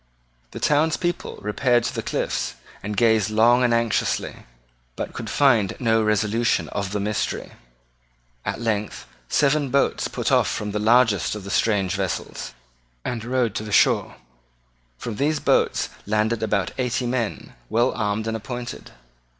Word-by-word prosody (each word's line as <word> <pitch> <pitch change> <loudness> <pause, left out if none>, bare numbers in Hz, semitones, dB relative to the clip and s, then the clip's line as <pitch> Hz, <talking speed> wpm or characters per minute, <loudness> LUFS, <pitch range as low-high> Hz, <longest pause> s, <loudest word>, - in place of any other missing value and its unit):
The - - -8
town's 150 +2 +2
people 175 -1 -3
repaired 120 +3 +2
to - - -2
the - - -3
cliffs, - - -2 0.3
and 105 0 -5
gazed 110 -2 +3
long 120 +3 +4
and 120 - +3
anxiously, 115 - 0 0.5
but - - -5
could - - -6
find 120 -9 +3
no 110 -3 +2
solution 110 +3 0
of 100 -2 -3
the 105 - -1
mystery. 105 +1 -2 0.9
At - - -3
length 110 -3 -2 0.2
seven 145 -1 +2
boats 140 +2 +1
put - - -2
off - - +4
from 105 -1 -3
the 105 - -2
largest 110 -3 +3
of 105 - -7
the 100 - -6
strange 100 -5 +1
vessels, 95 -3 -4 0.5
and 115 -3 -3
rowed 120 -2 0
to 110 - -3
the 105 - -7
shore. - - +3 0.8
From 110 - -5
these 150 +2 +1
boats - - +2 0.2
landed 110 +2 +1
about 105 -4 0
eighty 125 0 0
men, 120 -3 -3 0.2
well 120 +1 +2
armed 105 0 -1
and 110 0 -2
appointed. 120 +2 -6
110 Hz, 150 wpm, -23 LUFS, 105-125 Hz, 0.9 s, long